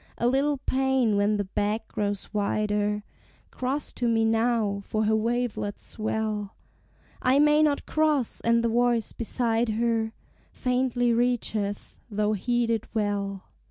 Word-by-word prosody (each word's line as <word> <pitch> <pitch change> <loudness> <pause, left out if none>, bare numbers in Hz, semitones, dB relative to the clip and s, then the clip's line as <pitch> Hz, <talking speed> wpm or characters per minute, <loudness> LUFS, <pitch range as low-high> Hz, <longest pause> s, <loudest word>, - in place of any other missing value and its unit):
A - - -1
little 275 +3 +2
pain 265 -4 +1
when 205 +1 +2
the 205 - 0
beck 205 +3 -2
grows 205 0 -3
wider 210 0 0 0.5
"Cross 265 +3 -3
to 245 - -1
me 225 -1 +2
now, 225 -3 +1
for 215 +2 -1
her 220 +1 +3
wavelets 230 -2 -2
swell:" 215 -2 -3 0.7
"I 255 +2 +3
may 300 +1 +5
not 295 -2 +2
cross" 305 -6 +1
and 230 0 +3
the 235 - +2
voice 240 -1 +1
beside 230 0 0
her 225 0 0 0.4
Faintly 250 -1 +1
reacheth, 225 -4 -1
though 210 0 0
heeded 230 +1 0
well. 200 -2 -1
225 Hz, 130 wpm, -26 LUFS, 210-245 Hz, 0.7 s, may